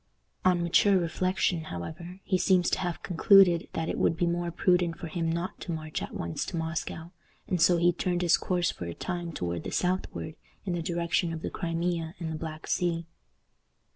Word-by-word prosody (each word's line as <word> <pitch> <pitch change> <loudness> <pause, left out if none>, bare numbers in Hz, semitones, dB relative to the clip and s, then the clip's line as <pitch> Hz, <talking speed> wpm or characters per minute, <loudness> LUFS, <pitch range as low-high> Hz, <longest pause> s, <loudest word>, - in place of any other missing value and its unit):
On 180 -2 +3
mature 190 +3 +4
reflection, 180 -1 0
however, 170 - -7
he 190 - 0
seems 185 -1 +3
to - - +1
have 175 -2 -3
concluded 180 -1 +5
that 165 0 -2
it - - -2
would 165 - +2
be 175 - +2
more 175 0 0
prudent 175 -1 +2
for 170 - -7
him 165 0 -1
not 170 +2 -3
to 175 - -4
march 155 -1 -4
at - - -6
once 85 -1 -3
to 175 - -4
Moscow, 160 +1 -4 0.4
and 180 -3 0
so 175 +1 +5
he 175 +1 +4
turned 175 +1 -1
his 170 -2 +5
course 175 -2 0
for 85 - -7
a 85 - -5
time 175 -2 -4
toward 85 - -3
the - - -4
southward, 180 -3 -2 0.3
in 185 - -1
the 175 - -1
direction 170 +1 0
of 160 -1 -6
the - - -3
Crimea 165 -1 -2
and 165 -2 -4
the 155 - -5
Black 155 -1 -6
Sea. 170 -2 0
170 Hz, 200 wpm, -28 LUFS, 165-180 Hz, 0.4 s, concluded